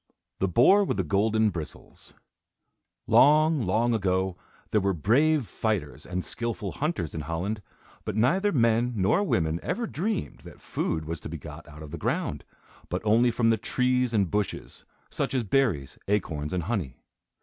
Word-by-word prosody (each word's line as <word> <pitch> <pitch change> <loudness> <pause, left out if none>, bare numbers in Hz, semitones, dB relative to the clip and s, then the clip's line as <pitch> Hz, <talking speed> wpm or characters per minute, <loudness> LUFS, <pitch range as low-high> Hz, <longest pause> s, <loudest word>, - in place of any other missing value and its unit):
THE 95 - +1
BOAR 125 - +5
WITH 190 - -1
THE 95 - +1
GOLDEN 110 +5 +2
BRISTLES 80 -4 -9 0.9
Long, 155 +1 +5
long 115 +4 +1
ago, 95 -3 0 0.4
there 105 - +3
were 95 -1 +1
brave 135 - +3
fighters 105 -9 -3
and 90 0 -3
skilful 115 -5 -4
hunters 150 - -2
in 80 - -4
Holland, 85 +8 -3 0.4
but - - -4
neither 180 - +2
men 115 - +2
nor 100 - +2
women 80 - 0
ever 235 - -2
dreamed 205 +1 -3
that - - -13
food 80 -1 -3
was 80 0 -5
to - - -7
be 85 - -5
got 75 0 -10
out 75 +1 -11
of 75 - -10
the 85 - -6
ground, - - -2 0.5
but - - -3
only 115 +3 +4
from 115 -1 +2
the 115 - +2
trees 125 0 0
and 100 -6 +1
bushes, 105 -1 -3 0.3
such - - -2
as 125 - +1
berries, 105 - 0
acorns 80 -7 -1
and 90 -2 -1
honey. 90 - -3
105 Hz, 165 wpm, -27 LUFS, 85-125 Hz, 0.9 s, BOAR